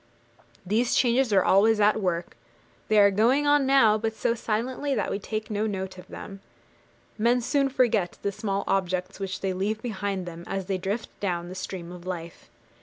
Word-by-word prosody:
These 225 Hz, +6 st, +1 dB
changes 250 Hz, -1 st, +3 dB
are 190 Hz, -2 st, +4 dB
always 215 Hz, +3 st, +4 dB
at 210 Hz, +1 st, +3 dB
work; 175 Hz, -2 st, -2 dB, 0.5 s
they 215 Hz, -, +3 dB
are 200 Hz, -1 st, +7 dB
going 240 Hz, +9 st, +3 dB
on 290 Hz, -2 st, +4 dB
now, 225 Hz, -6 st, +5 dB
but 220 Hz, 0 st, -2 dB
so 230 Hz, -, +1 dB
silently 245 Hz, +5 st, -2 dB
that -, -, -1 dB
we 200 Hz, -, -2 dB
take 215 Hz, +2 st, -5 dB
no 210 Hz, +1 st, 0 dB
note 190 Hz, -2 st, -4 dB
of 180 Hz, -, -13 dB
them. 195 Hz, 0 st, -9 dB, 0.8 s
Men 240 Hz, +3 st, +3 dB
soon 275 Hz, +3 st, +1 dB
forget 230 Hz, -9 st, +1 dB
the 200 Hz, -, 0 dB
small 200 Hz, -1 st, -2 dB
objects 185 Hz, -1 st, -1 dB
which 195 Hz, 0 st, -4 dB
they 190 Hz, -1 st, -1 dB
leave 205 Hz, +4 st, -1 dB
behind 200 Hz, -5 st, -3 dB
them 170 Hz, -1 st, -8 dB
as 195 Hz, -1 st, -3 dB
they 190 Hz, 0 st, -2 dB
drift 200 Hz, +5 st, -3 dB
down 175 Hz, -3 st, -2 dB
the -, -, -7 dB
stream 185 Hz, -2 st, -6 dB
of 180 Hz, 0 st, -10 dB
life. 170 Hz, -2 st, -7 dB
205 Hz, 185 wpm, -26 LUFS, 185-230 Hz, 0.8 s, are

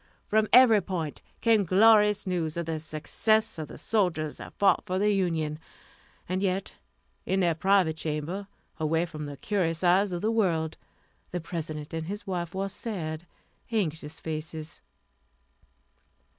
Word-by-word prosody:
From 215 Hz, 0 st, +2 dB
every 235 Hz, -5 st, +7 dB
point 170 Hz, -5 st, -4 dB, 0.2 s
came 225 Hz, -3 st, +4 dB
glorious 210 Hz, +2 st, +5 dB
news 170 Hz, -4 st, -2 dB
of 170 Hz, -, -2 dB
the 160 Hz, -1 st, -2 dB
success 160 Hz, +7 st, +1 dB
of 155 Hz, -, -4 dB
the -, -, -10 dB
soldiers 175 Hz, -8 st, 0 dB
that -, -, -11 dB
fought 200 Hz, -, +4 dB
for 185 Hz, 0 st, -1 dB
the 210 Hz, +2 st, +3 dB
Union. 160 Hz, -5 st, -1 dB, 0.7 s
And 185 Hz, +1 st, -1 dB
yet, 195 Hz, 0 st, -1 dB, 0.5 s
in 190 Hz, -, 0 dB
their 170 Hz, -2 st, +3 dB
private 180 Hz, -1 st, +2 dB
chamber, 160 Hz, +6 st, -3 dB, 0.3 s
away 160 Hz, +2 st, +1 dB
from 155 Hz, -3 st, -7 dB
the 145 Hz, -1 st, -7 dB
curious 175 Hz, -2 st, -1 dB
eyes 185 Hz, +3 st, +4 dB
of 175 Hz, -1 st, -3 dB
the 220 Hz, -, +1 dB
world, 170 Hz, -8 st, +1 dB, 0.5 s
the 180 Hz, -, -3 dB
President 155 Hz, -3 st, -6 dB
and 160 Hz, 0 st, -3 dB
his 205 Hz, +3 st, -5 dB
wife 175 Hz, -2 st, -3 dB
wore 195 Hz, +1 st, -1 dB
sad, 175 Hz, -6 st, -5 dB, 0.4 s
anxious 160 Hz, -7 st, -2 dB
faces. 155 Hz, 0 st, -6 dB
175 Hz, 145 wpm, -28 LUFS, 160-200 Hz, 0.7 s, every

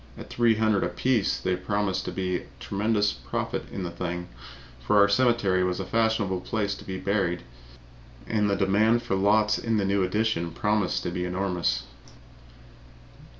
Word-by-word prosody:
At -, -, -10 dB
$300 110 Hz, -4 st, +2 dB
apiece 105 Hz, +5 st, 0 dB
there 95 Hz, 0 st, 0 dB
promised 95 Hz, 0 st, -1 dB
to -, -, -3 dB
be 90 Hz, -1 st, -1 dB
a -, -, -10 dB
tremendous 105 Hz, +1 st, 0 dB
profit 60 Hz, -3 st, -4 dB
in 95 Hz, -, -4 dB
the 85 Hz, -, -4 dB
thing, 90 Hz, 0 st, -4 dB, 0.5 s
for 60 Hz, +12 st, +1 dB
our 100 Hz, 0 st, +7 dB
cemetery 100 Hz, -4 st, +2 dB
was 90 Hz, 0 st, -1 dB
a 95 Hz, -, -3 dB
fashionable 110 Hz, -5 st, 0 dB
place 100 Hz, 0 st, -1 dB
to -, -, -9 dB
be 95 Hz, -1 st, -5 dB
buried 95 Hz, -3 st, -1 dB, 0.8 s
in -, -, -5 dB
and 105 Hz, -1 st, +2 dB
the 100 Hz, -, +2 dB
demand 105 Hz, +4 st, +2 dB
for 120 Hz, -, -2 dB
the 95 Hz, -, +1 dB
lots 105 Hz, +1 st, +3 dB
in 115 Hz, -1 st, 0 dB
the 100 Hz, -, +1 dB
new 100 Hz, 0 st, +1 dB
addition 100 Hz, -3 st, 0 dB
promised 105 Hz, -3 st, 0 dB
to 90 Hz, -, -2 dB
be 90 Hz, 0 st, -3 dB
enormous. 90 Hz, -9 st, -1 dB
100 Hz, 170 wpm, -26 LUFS, 90-110 Hz, 0.8 s, our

